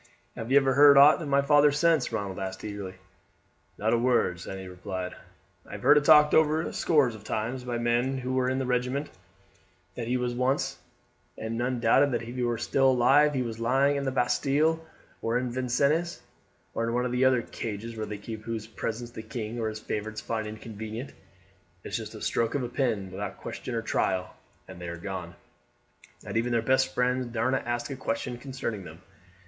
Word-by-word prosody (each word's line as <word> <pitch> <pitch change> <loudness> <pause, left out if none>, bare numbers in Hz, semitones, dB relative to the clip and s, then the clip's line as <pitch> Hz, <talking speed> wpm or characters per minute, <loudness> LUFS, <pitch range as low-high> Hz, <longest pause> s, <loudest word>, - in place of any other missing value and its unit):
"Have 115 +1 -6
you 140 - +7
ever 135 -1 +4
heard 140 +1 +8
aught 145 +4 +7
of 155 - -4
my 140 0 +3
father 145 0 +5
since?" 150 -3 +2
Ronald 100 -4 -3
asked 95 0 -5
eagerly. 100 -3 -6 0.8
"Not 110 +2 +1
a 120 - +3
word," 120 -8 +2
Sandy 95 +1 -7
replied. 90 0 -5 0.5
"I - - -13
have - - -7
heard - - +7
it 145 -1 +3
talked 150 -1 +7
over 160 +1 +3
scores 145 -7 +2
of 110 -1 -11
times 120 +5 -3
by 120 -1 -3
men 120 +3 +1
who 130 0 -3
were 130 -1 +1
in 130 - 0
the 130 - -1
regiment 125 +3 -1 0.8
that 115 -2 -5
was 125 -1 -1
once 125 +3 0 0.6
his, - - -6
and 115 +1 -3
none 125 +1 -1
doubted 140 +4 +4
that 120 - -1
if 120 +1 -7
he 125 - -2
were 120 -1 0
still 135 +3 +2
alive 135 +4 +4
he 130 - +1
was 115 -2 -5
lying 135 +5 +2
in 140 - -1
the 135 - -1
Bastille, 145 +5 +1 0.4
or 115 +2 +1
Vincennes, 130 +5 0 0.5
or 115 0 -1
one 125 +1 0
of 125 - -2
the 125 +1 +1
other 130 -2 +3
cages 115 +1 -6
where 110 -1 -4
they 105 0 -5
keep 110 +2 -7
those 110 - -19
whose 115 -2 -3
presence 115 +2 -4
the 110 - -7
king 110 0 -5
or 110 -1 -1
his 110 0 -6
favourites 110 0 -4
find 110 -1 -3
inconvenient. 110 +3 -7 0.7
It's - - -3
just - - -7
a - - -9
stroke 115 +2 0
of 140 - 0
the 120 - -3
pen, 115 -8 -1
without 100 +1 -5
question - - -6
or - - -2
trial, 95 -1 -1 0.3
and 90 - -11
they 90 - -5
are 85 0 -5
gone, 90 -1 -6 0.9
and - - -3
even 120 +2 0
their 115 -1 +1
best 130 +2 +2
friends 125 0 +1
darena 120 +3 0
ask 120 +2 -2
a - - -3
question 130 -2 -3
concerning 125 -6 -5
them. - - -11
120 Hz, 200 wpm, -28 LUFS, 110-135 Hz, 0.9 s, heard